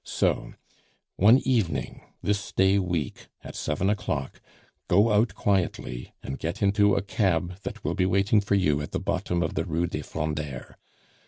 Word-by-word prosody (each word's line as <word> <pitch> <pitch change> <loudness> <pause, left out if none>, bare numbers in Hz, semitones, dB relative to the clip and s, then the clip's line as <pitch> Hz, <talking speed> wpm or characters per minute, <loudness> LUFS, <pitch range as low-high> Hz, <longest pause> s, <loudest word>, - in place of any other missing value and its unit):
So, - - -1 0.6
one 110 +6 +7
evening 95 - 0 0.2
this 100 -1 -1
day 95 +1 +3
week 85 -7 -3 0.2
at - - -9
seven 75 +6 -1
o'clock, 80 -9 -2 0.5
go 105 +5 +4
out 105 +3 +2
quietly 90 -10 -1
and 70 - -5
get 85 +5 -3
into 100 0 +4
a 100 - 0
cab 90 -3 0
that - - -7
will - - -1
be 90 - +1
waiting 100 +3 +3
for 100 0 +1
you 75 -7 +2
at 75 - -7
the - - 0
bottom 90 0 -1
of 80 - -2
the 80 - -1
Rue 85 +1 -1
des - - -4
Frondeurs. 75 -3 -4
90 Hz, 165 wpm, -26 LUFS, 80-100 Hz, 0.6 s, one